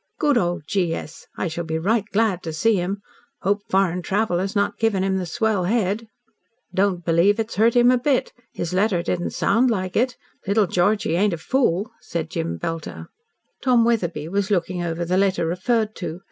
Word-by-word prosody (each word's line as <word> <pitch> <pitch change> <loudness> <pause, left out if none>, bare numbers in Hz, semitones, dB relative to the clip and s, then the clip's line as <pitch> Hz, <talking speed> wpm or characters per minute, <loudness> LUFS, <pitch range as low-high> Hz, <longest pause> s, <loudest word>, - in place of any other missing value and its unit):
Good 295 -3 +2
old 175 -8 0
G. 175 -2 0
S. 155 - -9
I - - -1
shall 170 +1 -4
be 160 -1 -2
right 205 +5 +1
glad 205 -4 +1
to 160 - -5
see 220 +8 +2
him. 195 +3 -3 0.4
Hope 200 +1 +1
foreign 185 -2 +2
travel 195 -1 0
has 195 +3 -3
not 200 0 0
given 215 -4 +1
him 190 0 +1
the 180 -2 -3
swell 210 0 0
head." 215 +1 0 0.7
"Don't 185 -2 +1
believe 175 +6 +3
it's 225 -1 -3
hurt 225 +3 +4
him 245 0 +6
a 250 - +3
bit. 265 +1 0 0.2
His 170 - -4
letter 190 -2 +2
didn't 175 0 -1
sound 230 +6 +2
like 185 -5 -2
it. 250 +2 +1 0.3
Little 205 +1 +3
Georgie 180 -1 +1
ain't 200 0 +2
a - - -2
fool," 215 - 0
said 165 -2 -5
Jem 85 +1 -3
Belter. 165 - -5 0.5
Tom 245 -3 +4
Wetherbee 175 -10 0
was 200 +1 -1
looking 180 -2 0
over 170 0 -2
the 180 +2 +1
letter 195 -3 +2
referred 215 +6 0
to. 170 -1 -5
195 Hz, 190 wpm, -22 LUFS, 175-220 Hz, 0.7 s, him